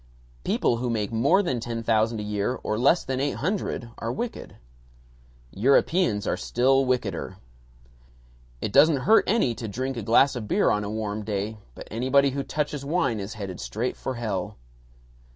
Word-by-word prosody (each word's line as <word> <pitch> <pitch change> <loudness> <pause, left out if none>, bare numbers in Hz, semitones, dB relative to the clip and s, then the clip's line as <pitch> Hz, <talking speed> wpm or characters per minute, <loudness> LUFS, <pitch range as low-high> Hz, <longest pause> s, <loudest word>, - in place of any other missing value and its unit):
People 120 - +1
who 120 +1 -2
make 110 -3 -1
more 115 - +3
than 130 -9 -1
ten 115 0 -4
thousand 110 0 +1
a - - -4
year 105 +4 -1
or 110 - -1
less 140 +8 +4
than 130 -1 -3
eight 140 +1 0
hundred 160 - -3
are 115 - -2
wicked. 235 - -5 1.0
Europeans 130 - +2
are - - 0
still 135 +2 +2
wickeder. 100 -7 -2 1.2
It 105 - -3
doesn't 145 -1 +5
hurt 225 - +5
any 205 - +2
to 115 0 -6
drink 130 +5 -3
a - - -3
glass 120 +6 +4
of 115 -4 -5
beer - - +2
on 105 - 0
a 100 - -4
warm 105 -1 -3
day, 105 +1 -3 0.2
but - - -10
anybody 130 +5 +2
who 140 +1 -2
touches 150 0 -3
wine 140 -7 0
is 100 +3 -6
headed 100 -4 -6
straight 120 +4 -3
for 130 - -4
hell. 105 -3 -3
120 Hz, 170 wpm, -25 LUFS, 105-135 Hz, 1.2 s, doesn't